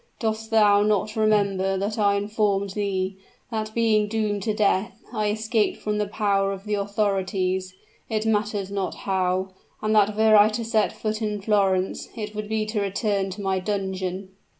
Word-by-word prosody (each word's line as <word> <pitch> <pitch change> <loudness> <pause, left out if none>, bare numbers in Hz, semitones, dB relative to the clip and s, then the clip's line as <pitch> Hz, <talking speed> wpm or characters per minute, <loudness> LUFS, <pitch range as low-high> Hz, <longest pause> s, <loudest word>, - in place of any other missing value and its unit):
Dost 220 -1 -2
thou 210 -2 +5
not 210 0 +1
remember 200 -3 +2
that 205 +3 -2
I 200 -1 +3
informed 200 -1 0
thee, 195 -1 -2 0.3
that 215 -1 -3
being 220 -2 +3
doomed 210 -2 -1
to 215 +2 -1
death, 210 0 +1
I 215 -2 0
escaped 220 +1 0
from 210 0 -2
the 210 - 0
power 200 -1 +1
of 195 0 -8
the 210 - -2
authorities 190 -2 -1 0.3
it 215 0 -1
matters 210 -2 0
not 195 -2 -2
how; 185 -1 0 0.3
and 215 0 0
that 210 0 +3
were 220 0 +5
I 210 +1 +7
to 230 +1 -3
set 220 -2 +2
foot 215 0 -3
in 210 -1 -2
Florence, 195 -2 +1
it 215 -2 -5
would 210 0 -5
be 220 -1 0
to 215 -1 -2
return 200 0 -1
to 190 +2 -7
my 190 -1 0
dungeon?" 190 -1 -3
205 Hz, 175 wpm, -24 LUFS, 195-215 Hz, 0.3 s, I